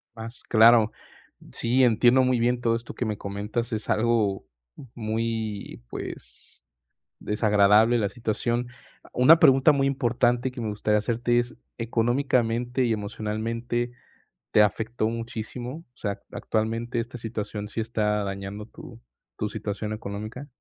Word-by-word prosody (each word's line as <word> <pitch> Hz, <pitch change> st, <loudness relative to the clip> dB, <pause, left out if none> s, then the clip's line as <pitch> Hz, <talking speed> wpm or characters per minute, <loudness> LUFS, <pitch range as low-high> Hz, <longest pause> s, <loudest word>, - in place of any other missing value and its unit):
Más 115 Hz, +2 st, -8 dB
claro. 115 Hz, 0 st, +6 dB, 0.6 s
Sí, 125 Hz, +3 st, +1 dB
entiendo 120 Hz, +2 st, +5 dB
muy 125 Hz, -1 st, +2 dB
bien 120 Hz, +1 st, +1 dB
todo 115 Hz, -1 st, +2 dB
esto 115 Hz, 0 st, -10 dB
que -, -, -2 dB
me 105 Hz, -2 st, -2 dB
comentas, 105 Hz, +4 st, -4 dB
es 110 Hz, -, -4 dB
algo 110 Hz, -3 st, +1 dB, 0.5 s
muy, 110 Hz, -, -3 dB
pues, -, -, -9 dB, 0.6 s
desagradable 105 Hz, +2 st, +4 dB
la 105 Hz, -3 st, +1 dB
situación. 120 Hz, +1 st, -2 dB, 0.5 s
Una 155 Hz, +7 st, +7 dB
pregunta 135 Hz, +2 st, +6 dB
muy 135 Hz, -1 st, +2 dB
importante 125 Hz, -1 st, +1 dB
que 125 Hz, -1 st, -7 dB
me 110 Hz, -, -2 dB
gustaría 105 Hz, 0 st, +1 dB
hacerte 120 Hz, +2 st, +1 dB
es: 120 Hz, 0 st, -4 dB, 0.2 s
¿Económicamente 120 Hz, +1 st, +1 dB
y 115 Hz, -, +1 dB
emocionalmente 115 Hz, +3 st, -3 dB, 0.6 s
te 105 Hz, -, +6 dB
afectó 110 Hz, +2 st, 0 dB
muchísimo? 115 Hz, +3 st, -5 dB, 0.2 s
O -, -, -30 dB
sea, 100 Hz, -2 st, -3 dB
¿actualmente 115 Hz, +2 st, -2 dB
esta 120 Hz, +2 st, -6 dB
situación 105 Hz, -2 st, -5 dB
sí 115 Hz, -, -4 dB
está 105 Hz, -2 st, 0 dB
dañando 100 Hz, +2 st, -5 dB
tu -, -, -13 dB, 0.4 s
tu 105 Hz, -, -1 dB
situación 105 Hz, 0 st, -4 dB
económica? 110 Hz, +5 st, -6 dB
115 Hz, 130 wpm, -26 LUFS, 105-120 Hz, 0.6 s, Una